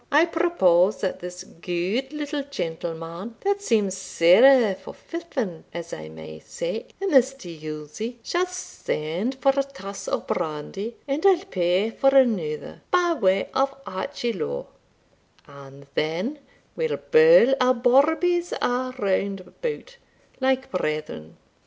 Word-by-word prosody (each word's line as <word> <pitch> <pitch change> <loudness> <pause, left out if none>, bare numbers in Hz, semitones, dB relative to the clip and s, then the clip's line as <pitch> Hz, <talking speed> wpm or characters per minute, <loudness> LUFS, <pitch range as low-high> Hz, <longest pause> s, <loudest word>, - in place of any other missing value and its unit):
I 300 +3 +6
propose 215 - +3
that 190 - -2
this 180 0 -7
good 180 +10 -3
little 295 -1 -3
gentleman, 170 -4 -5
that 400 0 0
seems 210 - +1
sair 200 +6 +5
forfoughen, 205 - -6
as 170 0 -6
I 80 0 -7
may 80 0 -10
say, - - -5
in 390 0 -1
this 270 -1 +5
tuilzie, 160 - -7
shall 360 +1 0
send 215 - -3
for 275 +1 +3
a 275 - +3
tass 200 -8 -8
o' - - -1
brandy 180 +9 -4
and 280 +3 -2
I'll 385 -1 +4
pay 185 - +1
for 270 +4 +3
another, 195 - +1
by 355 -1 +3
way 195 - +1
of 270 +1 +2 0.2
archilowe,* 210 - -3 0.8
and 140 0 -14
then 180 - -2 0.4
we'll 475 -1 -1
birl 475 - +6
our 255 0 +4
bawbees 320 +8 +3
a' 255 +1 -1
round 195 -2 0
about, 485 - -6 0.4
like 265 0 0
brethren." 155 - -4
230 Hz, 125 wpm, -24 LUFS, 175-285 Hz, 0.8 s, I